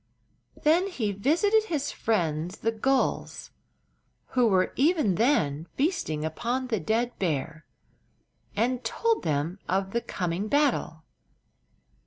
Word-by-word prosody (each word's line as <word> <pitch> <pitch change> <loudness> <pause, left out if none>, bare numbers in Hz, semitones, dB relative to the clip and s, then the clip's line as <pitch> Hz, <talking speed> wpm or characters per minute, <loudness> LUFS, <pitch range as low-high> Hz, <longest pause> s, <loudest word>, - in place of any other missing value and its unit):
Then 335 +5 +3
he 235 - -2
visited 345 - +2
his 295 -7 -2
friends, 175 -4 -1
the 225 - +3
gulls, 265 +4 -1 0.8
who 250 -2 +3
were 185 -3 +2
even 295 - +3
then 165 - +1
feasting 160 - -1
upon 240 +10 -2
the 220 -4 0
dead 230 +8 -1
bear, 155 -2 -2 0.9
and 245 +4 0
told 455 - 0
them 155 +5 -1
of 190 +1 0
the 235 - 0
coming 180 +1 -3
battle. 260 - +1
225 Hz, 115 wpm, -27 LUFS, 170-275 Hz, 0.9 s, Then